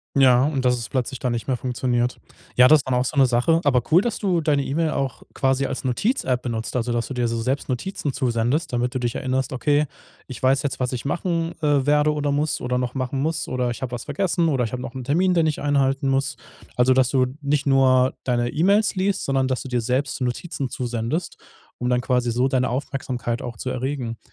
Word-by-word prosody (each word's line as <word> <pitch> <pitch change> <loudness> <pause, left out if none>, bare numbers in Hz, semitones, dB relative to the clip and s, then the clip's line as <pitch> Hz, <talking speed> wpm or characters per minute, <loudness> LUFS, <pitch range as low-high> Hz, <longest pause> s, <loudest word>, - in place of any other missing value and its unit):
Ja, 130 -2 +5
und 140 -4 -1
dass 125 0 +3
es 115 - -6
plötzlich 130 0 -2
dann 125 -2 -1
nicht 115 +2 -4
mehr 130 -2 0
funktioniert. 125 0 -1 0.4
Ja, 125 +1 +7
das 155 +3 +7
ist 130 - -7
dann 125 - +1
auch 125 +1 +1
so 145 - -3
'ne 135 - +7
Sache. 125 +8 +2
Aber 125 -5 +3
cool, 170 +4 +7
dass 235 0 -2
du 185 -5 0
deine 145 -3 +1
E-Mail 155 +3 0
auch 135 -3 -3
quasi 135 0 +1
als 130 - -4
Notiz-App 130 - 0
benutzt, 115 -2 -4
also 120 -1 0
dass 120 0 -1
du - - -5
dir 125 -1 0
so 115 0 -2
selbst 130 +4 -2
Notizen 145 +2 -3
zusendest, 130 +4 0
damit 125 +2 -1
du - - 0
dich 120 -1 -1
erinnerst: 130 0 -1
„Okay, 145 +4 +2 0.4
ich 130 - -8
weiß 130 +1 +3
jetzt, 135 -3 -2
was 125 -1 -1
ich 125 +2 -4
machen, 165 +2 -1
äh, 145 -3 +2
werde 150 +1 +3
oder 145 -1 -1
muss 150 +2 0
oder 125 0 -1
noch 125 +1 -3
machen 130 +1 -2
muss, 160 +2 -1
oder 125 -1 -1
ich 120 - -5
habe 125 - -3
was 120 -1 -5
vergessen 170 +3 0
oder 130 -4 +1
ich 115 - -3
habe 125 -1 -4
noch 130 - -7
'n 130 - -5
Termin, 180 +8 +2
den 165 -1 +3
ich 155 - -1
einhalten 140 -1 +1
muss.“ 135 -1 0 0.4
Also, 125 +1 +4
dass 130 -1 +3
du 130 -2 +2
nicht 145 0 0
nur 130 -1 +4
deine 120 -1 0
E-Mails 200 - +2
liest, 195 +1 0
sondern 135 -1 +1
dass 130 -1 -1
du - - -7
dir 125 -2 0
selbst 130 +4 -1
Notizen 125 +2 -3
zusendest, 120 +6 -3 0.4
um 125 - -2
dann 125 0 +2
quasi 125 -1 0
so 125 +3 +2
deine 130 -1 +1
Aufmerksamkeit 125 -3 -3
auch 120 -3 -6
zu 130 - -4
erregen. 125 -3 -3
130 Hz, 230 wpm, -23 LUFS, 125-145 Hz, 0.4 s, Ja